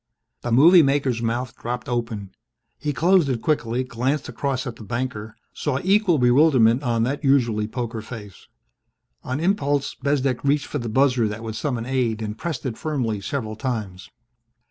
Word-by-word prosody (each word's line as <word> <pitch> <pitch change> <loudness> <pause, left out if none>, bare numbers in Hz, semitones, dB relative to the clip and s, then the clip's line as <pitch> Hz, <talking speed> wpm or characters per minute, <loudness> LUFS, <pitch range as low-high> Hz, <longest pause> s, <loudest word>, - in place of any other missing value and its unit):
The 120 - -3
movie 165 +9 +7
maker's 135 -4 +1
mouth 120 +1 -2
dropped 120 +1 -5
open. 115 -5 -3 0.5
He 150 - -2
closed 165 +3 +3
it 120 -4 -2
quickly, 130 -5 0
glanced 130 +4 -2
across 135 -2 -2
at 120 - -6
the - - -10
banker, 110 -2 -4 0.2
saw 145 -4 -2
equal 195 -2 +3
bewilderment 125 -2 +4
on 120 -4 0
that 140 +6 -2
usually 120 -6 +2
poker 115 -1 -4
face. 105 -3 -10 0.8
On 130 +3 -3
impulse, 145 -6 0
Bezdek 135 -3 -1
reached 140 +1 +2
for 145 - -4
the 120 -2 -4
buzzer 125 -1 +3
that 105 +2 -6
would 110 -1 -5
summon 120 -2 -2
aid 120 -4 -1
and 105 0 -4
pressed 155 0 -5
it 120 -4 -4
firmly 125 -10 -2
several 110 0 -4
times. 105 -6 -4
125 Hz, 165 wpm, -23 LUFS, 115-140 Hz, 0.8 s, movie